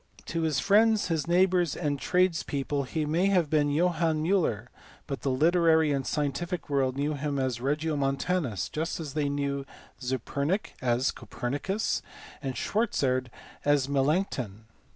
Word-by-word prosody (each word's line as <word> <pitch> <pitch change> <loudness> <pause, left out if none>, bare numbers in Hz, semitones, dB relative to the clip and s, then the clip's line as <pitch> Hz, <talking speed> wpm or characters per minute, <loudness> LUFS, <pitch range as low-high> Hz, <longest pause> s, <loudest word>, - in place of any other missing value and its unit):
To 165 - -2
his 155 -4 +1
friends, 215 0 +4
his 165 -2 -1
neighbours, 180 -2 +3
and 145 -4 -1
his - - -6
tradespeople 155 -6 +1
he 155 +4 -2
may 165 +6 +2
have 180 -6 +2
been 145 -2 +3
Johannes 160 -1 +1
Miiller, 160 - +1 0.4
but 135 -2 -5
the 140 - -1
literary 160 +2 +4
and 135 -2 -1
scientific 155 +3 -2
world 135 -2 +1
knew 145 +2 0
him 145 0 -2
as 130 -3 -1
Regiomontanus, 140 - 0
just 160 +3 -3
as 150 -4 -5
they 145 -2 0
knew 140 -1 -1 0.4
Zepernik 140 - -2
as 125 +1 +1
Copernicus, 145 - -2 0.4
and 135 -3 -3
Schwarzerd 130 - 0 0.4
as 145 -2 +3
Melanchthon. 135 - 0
150 Hz, 140 wpm, -28 LUFS, 135-170 Hz, 0.4 s, friends